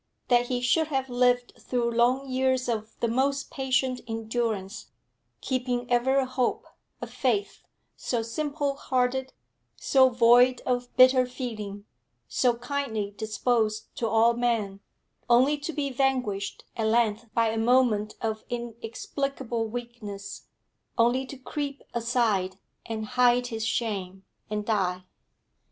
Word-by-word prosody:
That 245 Hz, -1 st, +4 dB
he 245 Hz, -1 st, -1 dB
should 310 Hz, +6 st, +2 dB
have 265 Hz, -3 st, -2 dB
lived 245 Hz, 0 st, +2 dB
through 240 Hz, -2 st, -1 dB
long 245 Hz, +4 st, +2 dB
years 260 Hz, 0 st, +1 dB
of 220 Hz, -2 st, -3 dB
the 235 Hz, -, +2 dB
most 270 Hz, +4 st, 0 dB
patient 265 Hz, -1 st, 0 dB
endurance, 225 Hz, -3 st, -3 dB, 0.5 s
keeping 250 Hz, -2 st, -1 dB
ever 250 Hz, +3 st, +3 dB
a 270 Hz, -, +3 dB
hope, 255 Hz, -, -1 dB, 0.4 s
a -, -, -2 dB
faith, 405 Hz, -, -1 dB, 0.3 s
so 235 Hz, -3 st, -2 dB
simple 285 Hz, +4 st, -2 dB
hearted, 260 Hz, 0 st, 0 dB, 0.4 s
so 260 Hz, -1 st, +4 dB
void 245 Hz, +1 st, +5 dB
of 245 Hz, -1 st, -1 dB
bitter 255 Hz, 0 st, +6 dB
feeling, 215 Hz, -6 st, -6 dB, 0.4 s
so 245 Hz, -2 st, +2 dB
kindly 235 Hz, -5 st, -3 dB
disposed 220 Hz, 0 st, -1 dB
to 230 Hz, -, 0 dB
all 225 Hz, +1 st, +4 dB
men 230 Hz, -5 st, -1 dB, 0.5 s
only 255 Hz, +5 st, +5 dB
to 295 Hz, +3 st, -4 dB
be 290 Hz, -3 st, -2 dB
vanquished 250 Hz, -7 st, -1 dB
at 220 Hz, -1 st, 0 dB
length 225 Hz, 0 st, +1 dB
by 230 Hz, -1 st, +3 dB
a 225 Hz, -, -2 dB
moment 225 Hz, -3 st, +2 dB
of 220 Hz, -1 st, -2 dB
inexplicable 235 Hz, +1 st, -3 dB
weakness, 220 Hz, -4 st, -7 dB, 0.5 s
only 245 Hz, +3 st, +2 dB
to 275 Hz, -, -8 dB
creep 280 Hz, +1 st, -5 dB
aside, 225 Hz, -6 st, 0 dB, 0.3 s
and 220 Hz, -1 st, -3 dB
hide 245 Hz, +1 st, +3 dB
his 220 Hz, 0 st, -2 dB
shame, 195 Hz, -5 st, -3 dB, 0.2 s
and 210 Hz, -1 st, -3 dB
die. 185 Hz, -4 st, 0 dB
240 Hz, 130 wpm, -27 LUFS, 225-260 Hz, 0.5 s, bitter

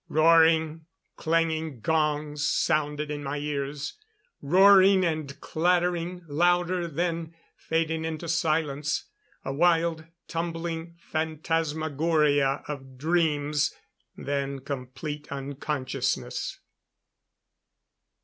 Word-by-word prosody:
Roaring, 160 Hz, 0 st, +4 dB, 0.3 s
clanging 160 Hz, -3 st, 0 dB
gongs 150 Hz, +1 st, 0 dB
sounded 150 Hz, -1 st, 0 dB
in 145 Hz, -1 st, -4 dB
my 140 Hz, +1 st, -3 dB
ears 145 Hz, -, -4 dB, 0.4 s
roaring 190 Hz, +3 st, +6 dB
and 155 Hz, -4 st, -3 dB
clattering 175 Hz, +1 st, 0 dB
louder, 175 Hz, +3 st, +2 dB
then 165 Hz, 0 st, -2 dB, 0.2 s
fading 160 Hz, 0 st, -1 dB
into 160 Hz, +1 st, -4 dB
silence. 155 Hz, -2 st, 0 dB, 0.4 s
A 135 Hz, -, -2 dB
wild, 165 Hz, 0 st, +2 dB, 0.2 s
tumbling 165 Hz, 0 st, -4 dB
phantasmagoria 155 Hz, -3 st, 0 dB
of 135 Hz, -3 st, -7 dB
dreams. 150 Hz, -1 st, +1 dB, 0.4 s
Then 140 Hz, -1 st, -3 dB
complete 140 Hz, +3 st, -6 dB
unconsciousness. 140 Hz, 0 st, -3 dB
155 Hz, 80 wpm, -27 LUFS, 145-165 Hz, 0.4 s, roaring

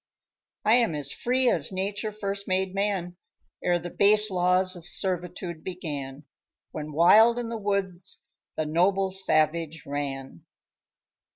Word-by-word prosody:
"I 220 Hz, +3 st, +6 dB
am 230 Hz, -10 st, +1 dB
as 140 Hz, -2 st, 0 dB
free 255 Hz, +1 st, 0 dB
as 160 Hz, -8 st, +2 dB
Nature 200 Hz, +3 st, -3 dB
first 200 Hz, -1 st, -4 dB
made 185 Hz, 0 st, 0 dB
man, 195 Hz, -3 st, -2 dB, 0.5 s
Ere 175 Hz, -1 st, +2 dB
the 175 Hz, 0 st, -7 dB
base 210 Hz, +1 st, +4 dB
laws 185 Hz, +1 st, +2 dB
of 175 Hz, -1 st, -11 dB
servitude 180 Hz, -2 st, -4 dB
began, 150 Hz, -6 st, -6 dB, 0.5 s
When 155 Hz, 0 st, -6 dB
wild 215 Hz, +10 st, +6 dB
in 240 Hz, -1 st, -3 dB
the 230 Hz, -, -4 dB
woods 195 Hz, -3 st, -3 dB, 0.4 s
the 155 Hz, -, -1 dB
noble 190 Hz, +5 st, +1 dB
savage 165 Hz, -3 st, +1 dB
ran." 135 Hz, -8 st, -5 dB
185 Hz, 130 wpm, -26 LUFS, 160-200 Hz, 0.5 s, I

